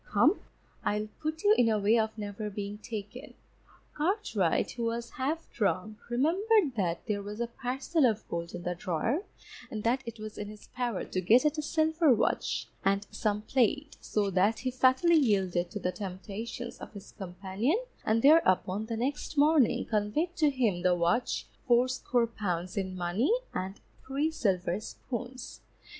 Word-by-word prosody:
Come, 300 Hz, -, +4 dB, 0.4 s
I'll 210 Hz, +1 st, 0 dB
put 315 Hz, +1 st, -3 dB
you 415 Hz, +1 st, +6 dB
in 235 Hz, -2 st, +5 dB
a 220 Hz, -, +2 dB
way 210 Hz, +3 st, +3 dB
of 220 Hz, 0 st, -1 dB
never 210 Hz, 0 st, -4 dB
being 205 Hz, 0 st, -5 dB
taken._ 220 Hz, +3 st, -7 dB, 0.6 s
Cartwright, 300 Hz, -, 0 dB
who 235 Hz, -2 st, -3 dB
was 230 Hz, 0 st, -3 dB
half 300 Hz, +5 st, -2 dB
drunk, 210 Hz, -1 st, -1 dB
remembered 330 Hz, -, +2 dB
that 175 Hz, -5 st, -1 dB
there 210 Hz, -3 st, -1 dB
was 205 Hz, +2 st, -7 dB
a 235 Hz, -, +1 dB
parcel 265 Hz, +5 st, 0 dB
of 220 Hz, -2 st, -2 dB
gold 170 Hz, 0 st, -4 dB
in 175 Hz, -, -6 dB
the 180 Hz, -, -1 dB
drawer, 180 Hz, -, -1 dB, 0.5 s
and 215 Hz, -5 st, -5 dB
that 245 Hz, +3 st, +2 dB
it 230 Hz, 0 st, -6 dB
was 215 Hz, 0 st, -8 dB
in 210 Hz, -, -4 dB
his 210 Hz, 0 st, -11 dB
power 245 Hz, -6 st, -2 dB
to 185 Hz, -, -2 dB
get 235 Hz, -, +5 dB
at 300 Hz, +1 st, +2 dB
a -, -, +1 dB
silver 315 Hz, 0 st, +2 dB
watch -, -, 0 dB, 0.2 s
and 200 Hz, +1 st, +2 dB
some 210 Hz, 0 st, -1 dB
plate, 270 Hz, +5 st, +1 dB
so 205 Hz, -2 st, 0 dB
that 195 Hz, +4 st, +3 dB
he 255 Hz, -, -1 dB
fatally 260 Hz, +7 st, +4 dB
yielded 190 Hz, -, +2 dB
to 210 Hz, -, -5 dB
the 180 Hz, -, -1 dB
temptations 205 Hz, +6 st, -6 dB
of -, -, -9 dB
his 200 Hz, -2 st, -10 dB
companion, 195 Hz, -, -2 dB, 0.3 s
and 225 Hz, +1 st, +1 dB
thereupon 215 Hz, -, +4 dB
the 225 Hz, -1 st, -3 dB
next 280 Hz, +5 st, -3 dB
morning, 295 Hz, -3 st, +4 dB
conveyed 220 Hz, -, 0 dB
to 310 Hz, -4 st, +4 dB
him 230 Hz, -10 st, 0 dB
the 180 Hz, 0 st, +3 dB
watch, 175 Hz, +8 st, +1 dB, 0.2 s
fourscore 245 Hz, 0 st, +3 dB
pounds 185 Hz, -6 st, -3 dB
in 190 Hz, -2 st, -2 dB
money, 180 Hz, -, +1 dB, 0.2 s
and 190 Hz, +2 st, -4 dB, 0.3 s
three 285 Hz, +4 st, 0 dB
silver 185 Hz, -, 0 dB
spoons. 250 Hz, +3 st, -7 dB
225 Hz, 165 wpm, -30 LUFS, 200-265 Hz, 0.6 s, you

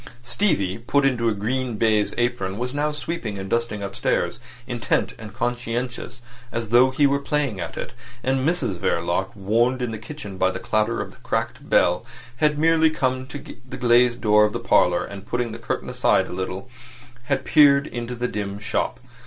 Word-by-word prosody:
Stevie, 120 Hz, -, 0 dB
put 140 Hz, +4 st, +1 dB
into 120 Hz, -4 st, +2 dB
a -, -, +1 dB
green 120 Hz, +3 st, -2 dB
baize 110 Hz, -1 st, +2 dB
apron, 120 Hz, -6 st, -1 dB
was 125 Hz, +2 st, -3 dB
now 150 Hz, +1 st, 0 dB
sweeping 150 Hz, -8 st, -4 dB
and 95 Hz, 0 st, -5 dB
dusting 115 Hz, -1 st, -1 dB
upstairs, 100 Hz, -1 st, -1 dB, 0.3 s
intent 120 Hz, -3 st, -1 dB
and 110 Hz, -2 st, -8 dB
conscientious, 120 Hz, +1 st, -3 dB, 0.3 s
as 115 Hz, -2 st, -3 dB
though 120 Hz, +3 st, +6 dB
he 135 Hz, +3 st, +2 dB
were 140 Hz, 0 st, +3 dB
playing 140 Hz, -7 st, -1 dB
at 85 Hz, -2 st, -5 dB
it; -, -, -5 dB, 0.3 s
and 135 Hz, +1 st, +1 dB
Mrs 135 Hz, -, 0 dB
Verloc, 85 Hz, +3 st, 0 dB
warned 115 Hz, +6 st, +1 dB
in 125 Hz, -2 st, -2 dB
the 110 Hz, -, -5 dB
kitchen 110 Hz, -6 st, -8 dB
by 95 Hz, -, +4 dB
the -, -, -4 dB
clatter 110 Hz, +2 st, 0 dB
of -, -, -6 dB
the -, -, -18 dB
cracked -, -, -3 dB
bell, -, -, +3 dB, 0.3 s
had 150 Hz, +2 st, +2 dB
merely 160 Hz, +1 st, +4 dB
come 130 Hz, -4 st, -1 dB
to 145 Hz, -, -6 dB
the 135 Hz, -1 st, -10 dB
glazed 120 Hz, -1 st, +4 dB
door 105 Hz, -1 st, +5 dB
of 105 Hz, 0 st, +2 dB
the -, -, -2 dB
parlour, 90 Hz, 0 st, +3 dB
and 100 Hz, 0 st, -9 dB
putting 120 Hz, -1 st, -1 dB
the 115 Hz, -, -7 dB
curtain 115 Hz, -, -3 dB
aside -, -, +2 dB
a -, -, -8 dB
little, 95 Hz, +4 st, -4 dB, 0.6 s
had 140 Hz, +1 st, -1 dB
peered 140 Hz, -2 st, +6 dB
into 120 Hz, -1 st, -5 dB
the 120 Hz, +1 st, -1 dB
dim 100 Hz, -3 st, -4 dB
shop. 105 Hz, +4 st, -2 dB
120 Hz, 185 wpm, -23 LUFS, 105-130 Hz, 0.6 s, though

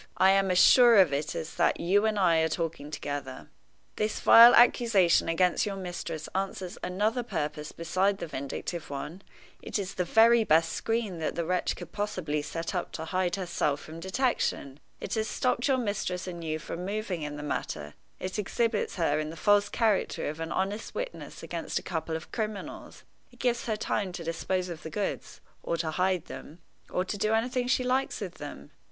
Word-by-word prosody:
I 190 Hz, +1 st, +6 dB
am 195 Hz, 0 st, +3 dB
as 180 Hz, -, +2 dB
sure 240 Hz, +4 st, +7 dB
of 180 Hz, -7 st, +5 dB
it 145 Hz, +2 st, -2 dB
as 160 Hz, -, -5 dB
that 170 Hz, -, +2 dB
you 200 Hz, +5 st, +3 dB
and 215 Hz, -1 st, 0 dB
I 175 Hz, -4 st, +4 dB
are 160 Hz, 0 st, +2 dB
talking 160 Hz, -3 st, -3 dB
together. 145 Hz, -3 st, -6 dB, 0.5 s
This 215 Hz, 0 st, -1 dB
vile 235 Hz, +1 st, +9 dB
accusation 220 Hz, -9 st, +4 dB
against 175 Hz, +2 st, +2 dB
your 200 Hz, -, -3 dB
mistress 175 Hz, -4 st, -5 dB
answers 190 Hz, -1 st, -3 dB
another 210 Hz, +7 st, 0 dB
purpose 150 Hz, -8 st, -4 dB
besides 185 Hz, +4 st, 0 dB
the -, -, -5 dB
vindictive 145 Hz, +2 st, -5 dB
one 150 Hz, +6 st, -6 dB, 0.4 s
it -, -, -3 dB
is 195 Hz, -3 st, -4 dB
the 180 Hz, -, -1 dB
very 225 Hz, +5 st, +5 dB
best 165 Hz, -3 st, +3 dB
screen 225 Hz, -6 st, -2 dB
that 155 Hz, -, -2 dB
the 170 Hz, -, -2 dB
wretch 180 Hz, +2 st, 0 dB
could -, -, -10 dB
possibly 185 Hz, -8 st, -2 dB
set 165 Hz, +3 st, -5 dB
up -, -, -3 dB
to 160 Hz, -, -5 dB
hide 180 Hz, 0 st, 0 dB
herself 170 Hz, -6 st, -1 dB
from 160 Hz, +1 st, -10 dB
detection. 190 Hz, -, -1 dB, 0.2 s
It -, -, -5 dB
has 220 Hz, -1 st, 0 dB
stopped 250 Hz, +2 st, 0 dB
your 270 Hz, -2 st, +3 dB
mistress 200 Hz, -6 st, -2 dB
and 170 Hz, -2 st, -6 dB
you 155 Hz, -1 st, -2 dB
from 165 Hz, +2 st, -6 dB
moving 200 Hz, -3 st, -3 dB
in 150 Hz, -1 st, -4 dB
the 145 Hz, -, -7 dB
matter; 75 Hz, -, -4 dB, 0.3 s
it 185 Hz, +3 st, -4 dB
exhibits 225 Hz, +1 st, -1 dB
her 155 Hz, -4 st, +1 dB
in 155 Hz, 0 st, -3 dB
the 160 Hz, -, -8 dB
false 205 Hz, +4 st, +3 dB
character 220 Hz, -4 st, 0 dB
of 150 Hz, +2 st, -7 dB
an 165 Hz, 0 st, -4 dB
honest 200 Hz, +3 st, -2 dB
witness -, -, -6 dB
against -, -, -4 dB
a -, -, -3 dB
couple 160 Hz, -2 st, -3 dB
of 160 Hz, -, -7 dB
criminals; 215 Hz, -4 st, -5 dB, 0.3 s
it 245 Hz, -, -19 dB
gives 240 Hz, -1 st, -1 dB
her 215 Hz, -2 st, 0 dB
time 200 Hz, -3 st, -2 dB
to 170 Hz, -, -6 dB
dispose 180 Hz, +3 st, -2 dB
of 170 Hz, -3 st, -7 dB
the 160 Hz, -, -7 dB
goods, 205 Hz, +4 st, -4 dB, 0.2 s
or 170 Hz, -, -2 dB
to 160 Hz, -1 st, -2 dB
hide 180 Hz, 0 st, 0 dB
them, 155 Hz, -, -10 dB, 0.3 s
or 180 Hz, -, -1 dB
to 205 Hz, +1 st, -4 dB
do 215 Hz, +2 st, +1 dB
anything 245 Hz, +2 st, 0 dB
she 255 Hz, 0 st, +2 dB
likes 255 Hz, +2 st, 0 dB
with 185 Hz, -4 st, -7 dB
them. 110 Hz, -, -9 dB
185 Hz, 195 wpm, -28 LUFS, 160-215 Hz, 0.5 s, vile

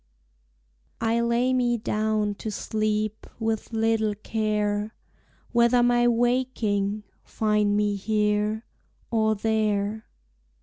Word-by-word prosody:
I 230 Hz, 0 st, +1 dB
lay 235 Hz, +2 st, +1 dB
me 245 Hz, -2 st, +2 dB
down 215 Hz, -1 st, 0 dB
to 220 Hz, -, -3 dB
sleep, 215 Hz, 0 st, -2 dB
With 225 Hz, 0 st, -2 dB
little 225 Hz, -1 st, +1 dB
care 210 Hz, 0 st, -1 dB, 0.6 s
Whether 235 Hz, 0 st, +4 dB
my 240 Hz, 0 st, +3 dB
waking 230 Hz, -4 st, 0 dB, 0.2 s
find 210 Hz, -1 st, +1 dB
Me 210 Hz, -1 st, +1 dB
here, 210 Hz, +1 st, 0 dB, 0.5 s
or 220 Hz, -1 st, +2 dB
there. 215 Hz, 0 st, -1 dB
220 Hz, 95 wpm, -25 LUFS, 210-230 Hz, 0.6 s, Whether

